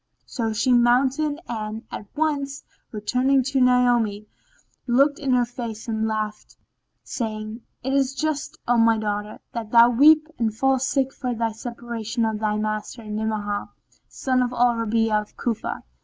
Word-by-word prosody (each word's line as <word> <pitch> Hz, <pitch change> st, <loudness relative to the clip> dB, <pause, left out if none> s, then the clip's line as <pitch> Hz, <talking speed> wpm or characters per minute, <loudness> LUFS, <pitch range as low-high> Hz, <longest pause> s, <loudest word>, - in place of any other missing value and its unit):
So 225 Hz, -3 st, -2 dB
she 245 Hz, +4 st, +2 dB
mounted 260 Hz, +5 st, +3 dB
and, 220 Hz, -1 st, -4 dB
at 205 Hz, -, -7 dB
once 285 Hz, -2 st, -1 dB, 0.3 s
returning 255 Hz, +5 st, +1 dB
to 270 Hz, +1 st, 0 dB
Naomi, 245 Hz, -4 st, +3 dB, 0.6 s
looked 275 Hz, +4 st, +3 dB
in 275 Hz, -2 st, -1 dB
her 245 Hz, -1 st, +3 dB
face 235 Hz, -2 st, -7 dB
and 220 Hz, -1 st, -1 dB
laughed 215 Hz, -1 st, -4 dB, 0.5 s
saying, 220 Hz, -1 st, -5 dB, 0.2 s
"It 265 Hz, +1 st, -1 dB
is 275 Hz, -1 st, +1 dB
just, 310 Hz, 0 st, -2 dB
O 245 Hz, 0 st, +3 dB
my 230 Hz, 0 st, +5 dB
daughter, 210 Hz, 0 st, -3 dB
that 230 Hz, -2 st, -5 dB
thou 235 Hz, +1 st, +7 dB
weep 305 Hz, +5 st, +6 dB
and 225 Hz, -2 st, +1 dB
fall 270 Hz, +1 st, +2 dB
sick 265 Hz, +1 st, 0 dB
for 250 Hz, -3 st, -3 dB
thy 230 Hz, 0 st, -1 dB
separation 235 Hz, 0 st, -4 dB
from 220 Hz, -1 st, -1 dB
thy 210 Hz, -1 st, 0 dB
master, 215 Hz, +2 st, -3 dB
Ni'amah, 210 Hz, -1 st, -3 dB, 0.4 s
son 255 Hz, -1 st, 0 dB
of 245 Hz, -1 st, 0 dB
Al 245 Hz, 0 st, +3 dB
Rabi'a 225 Hz, -1 st, +1 dB
of 210 Hz, -, -15 dB
Cufa." 230 Hz, -3 st, -3 dB
235 Hz, 155 wpm, -23 LUFS, 220-260 Hz, 0.6 s, thou